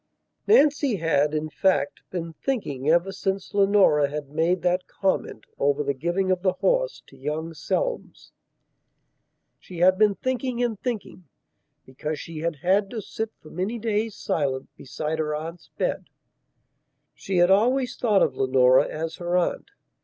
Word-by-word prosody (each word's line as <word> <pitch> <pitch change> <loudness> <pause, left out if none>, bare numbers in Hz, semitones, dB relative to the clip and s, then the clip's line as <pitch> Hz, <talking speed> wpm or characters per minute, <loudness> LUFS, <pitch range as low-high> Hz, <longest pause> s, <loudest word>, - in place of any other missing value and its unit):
III 430 - +8
NANCY 285 - +3
had, 155 -4 +1
in 155 0 -1
fact, 155 -3 0
been 170 -2 -5
thinking 155 - -2
ever 170 +4 +3
since 195 0 -3
Leonora 195 -8 +4
had 145 -1 -6
made 170 +4 +1
that 180 +1 +1
comment 190 - -2
over 145 +1 +2
the 140 0 0
giving 175 +7 -1
of 185 -1 0
the 185 -1 +2
horse - - 0
to - - -18
young 150 +4 -4
Selmes. 475 - -3 1.3
She 180 - -11
had 185 +2 +4
been 210 -2 +4
thinking 255 0 -2
and 225 -4 -1
thinking, 215 -7 -5 0.6
because 150 +3 -5
she 165 -2 -7
had 165 0 -2
had 190 +7 +1
to 230 - -5
sit 220 +2 -4
for 155 - -13
many 190 +7 -2
days 220 -1 -1
silent 135 -4 -2
beside 155 +4 -4
her 150 -1 -1
aunt's 165 +3 -7
bed. - - -1 1.1
(She 190 -1 -3
had 175 +1 +5
always 250 +5 +3
thought 210 -5 +3
of 135 - 0
Leonora 130 -1 +4
as 160 +1 -5
her 175 0 0
aunt.) 180 - -1
175 Hz, 155 wpm, -25 LUFS, 150-210 Hz, 1.3 s, III